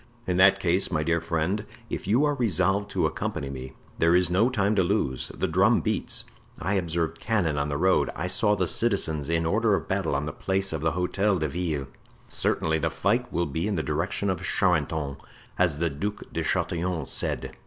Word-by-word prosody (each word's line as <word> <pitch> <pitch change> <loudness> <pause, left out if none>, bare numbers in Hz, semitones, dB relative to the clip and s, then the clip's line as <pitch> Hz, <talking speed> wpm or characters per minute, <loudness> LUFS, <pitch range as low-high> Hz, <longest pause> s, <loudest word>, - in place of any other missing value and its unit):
"In 90 -1 0
that 95 +1 +6
case, 90 +1 +2
my 75 -3 0
dear 85 +1 +1
friend, 85 +5 -1 0.2
if - - -5
you 120 +9 +3
are 145 - +2
resolved 100 - +1
to - - 0
accompany 70 - -3
me 65 0 -7 0.3
there 85 +1 +4
is 90 -1 +3
no 105 +7 +3
time 105 -4 +1
to - - +5
lose; 85 - 0
the - - -3
drum - - +4
beats; - - -2 0.3
I 95 +5 -2
observed 85 -3 -1
cannon 100 -9 0
on 70 +1 -1
the 70 - -1
road; 95 +4 +3
I - - -3
saw 105 +3 +2
the 95 -2 0
citizens 80 -8 0
in 85 0 +1
order 105 +4 +2
of - - -4
battle 95 -6 0
on 70 +2 -1
the 75 - -3
Place 95 -2 -1
of 80 - -3
the 80 -1 +1
Hotel 95 +3 +1
de 80 -2 -1
Ville; 75 -3 -2 0.4
certainly 80 0 0
the 80 +1 0
fight 110 +9 0
will 85 +1 0
be 80 +5 -2
in 105 - -1
the 80 - -1
direction 100 -1 -1
of 90 -2 -3
Charenton, 80 -7 0 0.4
as 85 -5 +3
the 85 +1 0
Duc 100 +9 -4
de - - -1
Chatillon 85 -3 -1
said." - - -2
90 Hz, 205 wpm, -26 LUFS, 80-100 Hz, 0.4 s, that